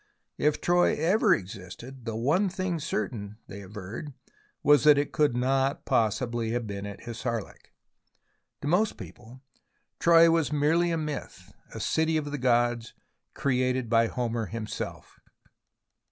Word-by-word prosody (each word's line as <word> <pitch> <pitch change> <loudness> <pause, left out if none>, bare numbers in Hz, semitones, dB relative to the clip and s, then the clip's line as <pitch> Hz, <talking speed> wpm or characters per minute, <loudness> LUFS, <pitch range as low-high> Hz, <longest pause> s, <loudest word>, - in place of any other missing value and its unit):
If 150 0 +2
Troy 175 0 +3
ever 195 +7 +2
existed, 100 +7 -9
the 115 -2 -3
one 155 - +2
thing 185 -2 -2
certain, 105 -7 -4
they 100 +1 -9
averred, 105 +8 -8 0.5
was 145 -2 +5
that 150 -1 +7
it 145 - 0
could 145 -5 +2
not 135 +2 0
possibly 115 +1 0
have 120 -1 -1
been 100 -1 -5
at 100 -1 -9
HissarHk. 115 -2 -5 0.9
To - - -2
most 200 +7 +2
people 120 +3 -12 0.6
Troy 165 0 +6
was 165 -3 +1
merely 155 +4 +2
a 165 - 0
myth, 150 -2 -6 0.2
a - - -7
city 160 0 +1
of 145 -2 -3
the 145 - -3
gods 120 -2 +1 0.4
created 130 -2 0
by 115 0 +4
Homer 115 -2 -2
himself. 110 0 -6
130 Hz, 140 wpm, -27 LUFS, 115-155 Hz, 0.9 s, that